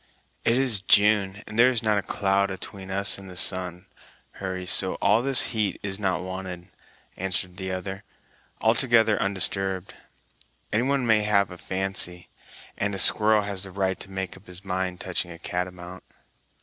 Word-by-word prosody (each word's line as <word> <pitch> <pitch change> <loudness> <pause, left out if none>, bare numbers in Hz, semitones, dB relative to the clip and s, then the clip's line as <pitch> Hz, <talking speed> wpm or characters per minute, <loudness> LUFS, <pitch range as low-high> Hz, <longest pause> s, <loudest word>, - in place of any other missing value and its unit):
"It 115 - +2
is 125 -7 +3
June, 100 -1 +3
and 110 +1 -6
there 120 +2 +7
is 120 -3 -1
not 105 -2 +2
a - - -2
cloud 100 0 0
atween 95 0 -7
us 100 +1 +2
and 95 -1 -11
the 90 - -10
sun, 90 -1 +1 0.5
Hurry, 95 -1 -5
so 95 +1 +4
all 105 +3 +2
this 135 0 +3
heat 105 -4 -1
is 100 0 -3
not 95 -4 -1
wanted," 95 -1 -7 0.5
answered 95 -1 -3
the 95 -1 -4
other, 95 +2 -5 0.6
altogether 115 -1 +3
undisturbed; 95 -1 -1 0.8
"any 110 - +3
one 135 0 0
may 110 -2 +4
have 100 -2 +2
a 90 - -9
fancy, 95 -2 -2 0.5
and 100 0 -1
a - - -4
squirrel 105 +2 +5
has 100 -2 -4
a - - -11
right 95 0 -1
to 95 - -7
make 95 -1 -5
up 95 +2 -18
his 90 +2 -9
mind 90 -1 -3
touching 90 -1 -2
a 85 - -9
catamount." 90 +1 -5
95 Hz, 170 wpm, -25 LUFS, 95-105 Hz, 0.8 s, there